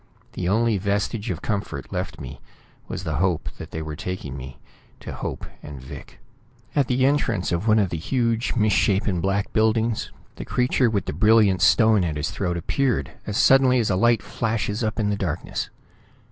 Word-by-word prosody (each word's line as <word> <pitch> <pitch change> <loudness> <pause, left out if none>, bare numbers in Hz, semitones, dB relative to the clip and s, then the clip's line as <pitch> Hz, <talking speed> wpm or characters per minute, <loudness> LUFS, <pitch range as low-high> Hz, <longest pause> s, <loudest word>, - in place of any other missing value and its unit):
The 90 -1 -2
only 110 0 +2
vestige 100 +3 -1
of 90 0 -4
comfort 105 -2 -3
left - - -4
me 65 -1 -9 0.5
was 95 - -5
the 80 -5 -2
hope 90 -1 0
that - - -7
they 80 - -5
were 75 0 -5
taking 80 -5 -5
me 65 -1 -8 0.4
to - - -7
Hope - - -5 0.2
and 75 -2 -9
Vic. 65 - -11 0.6
At 140 -4 +3
the 130 +1 +2
entrance 125 -11 +1
of 85 +5 -1
one 110 0 +5
of 100 -4 +2
the 85 - -3
huge 115 - 0
misshapen 105 -4 +2
black 100 +2 -1
buildings, 110 +1 +1 0.3
the - - -5
creature 125 0 +1
with 100 -4 -1
the - - -3
brilliant 105 0 +4
stone 110 +3 +5
at 80 -3 -1
his 75 +1 -2
throat 90 -3 -2
appeared 130 +8 0 0.2
as 105 0 -2
suddenly 130 -1 +5
as 115 -4 +1
a - - +2
light 115 +3 +3
flashes 110 -1 -2
up 110 +1 -1
in 105 -2 +1
the - - +1
darkness. 85 -4 -3
105 Hz, 185 wpm, -23 LUFS, 90-115 Hz, 0.6 s, one